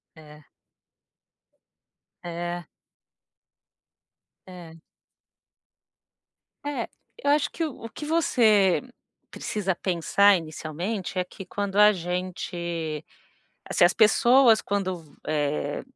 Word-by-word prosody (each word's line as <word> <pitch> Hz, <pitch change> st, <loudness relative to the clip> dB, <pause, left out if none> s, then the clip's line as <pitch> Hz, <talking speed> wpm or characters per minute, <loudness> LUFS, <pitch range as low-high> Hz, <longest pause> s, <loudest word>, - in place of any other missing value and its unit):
É. 150 Hz, -1 st, -15 dB, 1.8 s
É. 175 Hz, 0 st, -4 dB, 1.8 s
É. 170 Hz, -3 st, -12 dB, 1.8 s
É, 290 Hz, 0 st, -3 dB, 0.3 s
eu 285 Hz, -12 st, +1 dB
acho 295 Hz, 0 st, +2 dB
que 330 Hz, -, -2 dB
o 270 Hz, -6 st, -8 dB
o -, -, -6 dB
que 295 Hz, -, -8 dB
você 220 Hz, -, +3 dB, 0.5 s
precisa 195 Hz, -3 st, -2 dB
pensar 195 Hz, +3 st, +3 dB
inicialmente, 170 Hz, +5 st, -5 dB
é 180 Hz, -, +2 dB
que 195 Hz, +2 st, -11 dB
quando 200 Hz, 0 st, -3 dB
a 210 Hz, 0 st, +8 dB
gente 170 Hz, -3 st, -4 dB, 0.7 s
se -, -, +5 dB
as 175 Hz, -, +5 dB
pessoas 235 Hz, +1 st, +5 dB
quando, 185 Hz, -4 st, -2 dB, 0.2 s
eh, 145 Hz, -1 st, -1 dB
185 Hz, 90 wpm, -25 LUFS, 170-215 Hz, 1.8 s, a